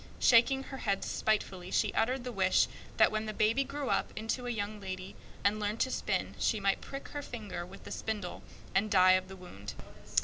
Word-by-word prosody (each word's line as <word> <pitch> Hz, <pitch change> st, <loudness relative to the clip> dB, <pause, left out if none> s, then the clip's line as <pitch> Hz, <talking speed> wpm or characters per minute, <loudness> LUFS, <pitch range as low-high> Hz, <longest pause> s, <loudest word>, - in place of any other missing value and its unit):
Shaking 265 Hz, +3 st, +5 dB
her 270 Hz, -, -7 dB
head 200 Hz, -6 st, 0 dB
spitefully, 190 Hz, -4 st, -1 dB
she 210 Hz, +1 st, +1 dB
uttered 250 Hz, +2 st, +1 dB
the 250 Hz, -, -4 dB
wish 190 Hz, -4 st, +3 dB, 0.3 s
that -, -, +6 dB
when 215 Hz, 0 st, -1 dB
the 215 Hz, -, -4 dB
baby 230 Hz, +6 st, +3 dB
grew 280 Hz, 0 st, -4 dB
up -, -, +1 dB
into 225 Hz, +3 st, -2 dB
a -, -, -1 dB
young 210 Hz, -2 st, -3 dB
lady, 185 Hz, -1 st, -6 dB, 0.3 s
and 205 Hz, +1 st, +3 dB
learned 210 Hz, +2 st, -1 dB
to 260 Hz, -, +2 dB
spin, -, -, -1 dB
she 220 Hz, -, +2 dB
might 195 Hz, 0 st, +1 dB
prick 275 Hz, 0 st, -7 dB
her 290 Hz, -, -4 dB
finger 210 Hz, -9 st, -6 dB
with 195 Hz, +2 st, -13 dB
a -, -, -8 dB
spindle 210 Hz, -5 st, -4 dB, 0.3 s
and 205 Hz, +3 st, +2 dB
die 185 Hz, -2 st, +6 dB
of 185 Hz, 0 st, +3 dB
the 190 Hz, -, -9 dB
wound. 105 Hz, -, -9 dB
215 Hz, 205 wpm, -32 LUFS, 190-240 Hz, 0.3 s, that